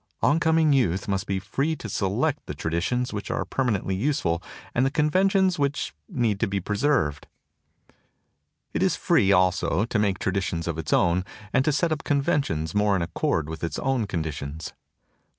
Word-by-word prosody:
On 150 +3 +4
coming 160 -2 +3
youth 100 -9 +1
must 100 -1 -1
be 95 - 0
free 135 +11 -1
to 125 - -7
select 120 +10 -1
the 75 - -5
traditions 85 - -1
which 105 -1 -5
are - - -1
permanently 110 -7 -1
useful 95 - 0 0.3
and 125 - +2
the 135 - +3
conventions 185 +4 +2
which 140 0 -1 0.2
need 120 - 0
to 115 - +1
be 100 0 -1
preserved. 100 - 0 1.5
It - - -1
is - - +3
free 95 - +3
also 95 +2 +2
to 115 -2 -1
make 100 -3 +1
traditions 90 -4 -2
of 80 -1 -2
its 80 - -4
own 85 +1 +3 0.3
and 130 - +4
to 155 - +3
set 160 +3 +1
up 155 - -2
conventions 140 - 0
more 105 -1 +3
in 90 - 0
accord 80 -2 -1
with 80 +1 -7
its 85 - -2
own 130 -5 0
conditions. 80 -2 -4
105 Hz, 170 wpm, -25 LUFS, 90-140 Hz, 1.5 s, On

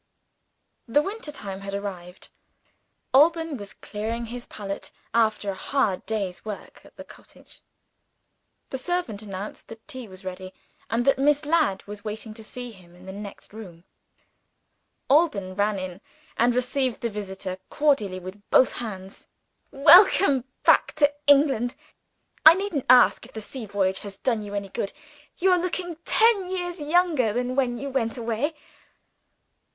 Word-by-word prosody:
The 290 +6 +3
winter 395 -5 -5
time 195 -7 -6
had 195 0 -5
arrived. 185 -3 -7 0.8
Alban 325 +2 +4
was 205 -2 -9
clearing 225 +3 -4
his 240 +1 -7
palette, 200 -1 -6 0.2
after 215 -3 +2
a - - -5
hard 205 -2 -1
day's 200 -5 -3
work 210 -2 -8
at - - -19
the - - -9
cottage. - - -17 1.1
The 265 - -3
servant 345 - -2
announced 200 -1 -7
that 225 0 -13
tea 260 -6 -7
was 185 0 -13
ready, 185 0 -7 0.3
and 235 +2 0
that 275 -1 +3
Miss 295 +2 +3
Ladd 300 - +1
was 205 0 -9
waiting 220 0 -6
to 220 0 -11
see 245 +2 -7
him 180 -4 -17
in 180 +1 -16
the 190 - -7
next 200 0 -10
room. 180 -6 -11 1.2
Alban 240 - +2
ran 205 +1 0
in, 185 0 -6 0.3
and 240 +1 +2
received 255 0 0
the 235 - -1
visitor 190 -2 -5
cordially 270 -11 +1
with 185 +3 -9
both 255 - +5
hands. 195 -5 -8 0.4
"Welcome 295 - +6 0.2
back - - +5
to 290 -2 +3
England! 275 -4 +4 0.7
I 320 +1 +10
needn't 380 -8 -3
ask 250 -1 +6
if - - -13
the 220 - -5
sea 225 +1 -7
voyage 190 -1 0
has 200 -1 -9
done 230 -1 0
you 205 -1 -3
good. 195 +1 -4 0.4
You 375 +1 +3
are 360 - +4
looking 350 -1 -3
ten 440 -5 +3
years 355 -1 -3
younger 300 - +2
than 250 +2 -2
when 250 -3 +1
you 280 +2 -5
went 240 -2 -1
away." 235 +7 -2
230 Hz, 150 wpm, -25 LUFS, 200-290 Hz, 1.2 s, I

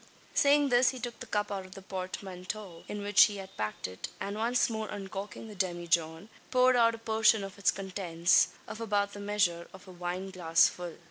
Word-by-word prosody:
Saying 285 0 +4
this, 245 0 +5
he 260 - -5
took 240 -1 -6
the - - -8
cup 205 0 -1
out 195 -1 -3
of 185 0 -13
the 195 - -9
portmanteau, 185 0 -6
in 210 -1 -5
which 205 -1 +7
he 205 -2 -4
had 195 0 -9
packed 105 -3 -3
it; 95 0 -7
and, 200 +1 -4
once 235 +3 +2
more 220 -2 -4
uncorking 200 +2 -6
the 215 - -9
demijohn, 170 -2 -1 0.2
poured 255 0 +4
out 230 -1 +4
a - - -9
portion 220 -1 +3
of 195 +1 -8
its 200 - +3
contents 185 -3 +2 0.2
of 220 - -7
about 205 -2 0
the 205 - -8
measure 200 -4 0
of 190 0 -14
a - - -10
wineglassful. 175 -1 0
195 Hz, 195 wpm, -30 LUFS, 180-220 Hz, 0.2 s, which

